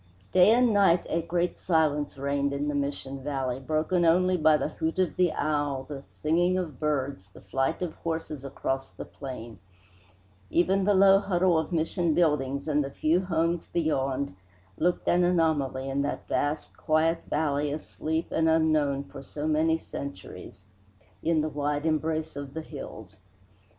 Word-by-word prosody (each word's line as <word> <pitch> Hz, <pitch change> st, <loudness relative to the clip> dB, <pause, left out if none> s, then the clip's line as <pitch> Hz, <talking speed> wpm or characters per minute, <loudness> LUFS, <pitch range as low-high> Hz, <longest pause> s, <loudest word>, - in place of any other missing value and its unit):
Day 185 Hz, +2 st, +6 dB
and 240 Hz, 0 st, +4 dB
night 195 Hz, -4 st, +4 dB
a 165 Hz, -, 0 dB
great 170 Hz, +1 st, -1 dB
silence 150 Hz, -5 st, +1 dB
reigned 140 Hz, +1 st, 0 dB
in 145 Hz, +1 st, -1 dB
the -, -, -1 dB
Mission 140 Hz, -1 st, -3 dB
valley, 135 Hz, -3 st, -2 dB
broken 155 Hz, +6 st, 0 dB
only 180 Hz, +2 st, +4 dB
by 155 Hz, -2 st, +4 dB
the 150 Hz, -, -2 dB
hoot 160 Hz, +2 st, -3 dB
of 185 Hz, -2 st, +1 dB
the 180 Hz, -2 st, +3 dB
owl, 145 Hz, -3 st, -1 dB
the 140 Hz, 0 st, -7 dB
singing 175 Hz, +4 st, +1 dB
of 160 Hz, -8 st, -4 dB
birds, 140 Hz, -9 st, -2 dB
the 100 Hz, -, -16 dB
flight 135 Hz, -, -1 dB
of 170 Hz, -, -3 dB
horses 160 Hz, -4 st, -4 dB
across 135 Hz, 0 st, -3 dB
the -, -, -9 dB
plain. 120 Hz, -4 st, -8 dB, 0.9 s
Even 190 Hz, +3 st, +2 dB
the 205 Hz, 0 st, +4 dB
low 195 Hz, 0 st, +7 dB
huddle 185 Hz, -3 st, +2 dB
of 160 Hz, +1 st, 0 dB
Mission 165 Hz, 0 st, 0 dB
buildings 140 Hz, -4 st, +1 dB
and 150 Hz, -1 st, +2 dB
the 135 Hz, -, -4 dB
few 160 Hz, +6 st, +1 dB
homes 170 Hz, -1 st, 0 dB
beyond 140 Hz, -, -1 dB, 0.4 s
looked 175 Hz, +2 st, 0 dB
an 180 Hz, +1 st, +4 dB
anomaly 155 Hz, -7 st, +1 dB
in 135 Hz, +1 st, -1 dB
that 145 Hz, +1 st, -3 dB
vast 145 Hz, +1 st, -1 dB
quiet 160 Hz, +2 st, +1 dB
valley 145 Hz, -1 st, 0 dB
asleep 160 Hz, +2 st, -3 dB
and 160 Hz, 0 st, +2 dB
unknown 155 Hz, -3 st, +2 dB
for -, -, -11 dB
so 145 Hz, +2 st, -5 dB
many 160 Hz, +1 st, +2 dB
centuries 100 Hz, -, -9 dB, 0.6 s
in 160 Hz, -1 st, +2 dB
the 155 Hz, -, -1 dB
wide 145 Hz, 0 st, -2 dB
embrace 160 Hz, 0 st, -1 dB
of 140 Hz, 0 st, -7 dB
the 160 Hz, -, -4 dB
hills. -, -, -9 dB
155 Hz, 160 wpm, -27 LUFS, 140-170 Hz, 0.9 s, low